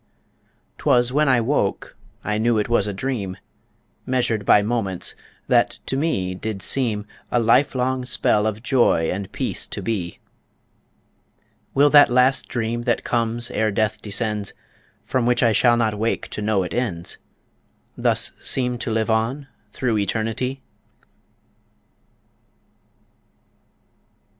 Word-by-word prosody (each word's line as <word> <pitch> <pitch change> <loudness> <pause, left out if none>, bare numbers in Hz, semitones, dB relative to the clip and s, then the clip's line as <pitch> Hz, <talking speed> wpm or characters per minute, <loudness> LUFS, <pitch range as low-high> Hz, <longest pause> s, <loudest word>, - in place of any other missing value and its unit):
'Twas 120 0 +2
when 150 0 +3
I 130 -2 +4
woke 115 -5 -1 0.3
I 105 0 -1
knew 115 0 +2
it 105 - 0
was 120 -4 +2
a - - -1
dream, 100 -3 -4 0.7
Measured 120 -5 -1
by 100 - +6
moments, 105 -5 -1 0.3
that - - +2
to - - -2
me 115 - -1
did 95 +1 -5
seem, 110 -6 +1 0.2
A 120 - +1
life 125 +5 +3
long 130 0 -1
spell 105 -3 +2
of 110 +1 -4
joy 120 - +2
and 95 +1 -5
peace - - -2
to - - -6
be 95 -7 -3 1.6
Will 145 +1 +5
that 145 -1 +7
last 125 +2 +2
dream 120 0 -2
that 120 - 0
comes 120 0 -1
ere 110 0 +1
death 105 0 -1
descends, 105 -1 -3 0.5
From 125 -2 0
which 125 0 +2
I 115 - +4
shall 120 +2 +3
not 110 -2 +1
wake 115 +1 -1
to - - -5
know 105 -2 +1
it 90 - -6
ends, 105 -9 -3 0.8
Thus - - +2
seem 125 -2 0
to 120 - -3
live 110 0 0
on 125 +6 -1 0.2
through 115 -1 -1
Eternity? 115 +6 -2
115 Hz, 135 wpm, -22 LUFS, 105-125 Hz, 1.6 s, that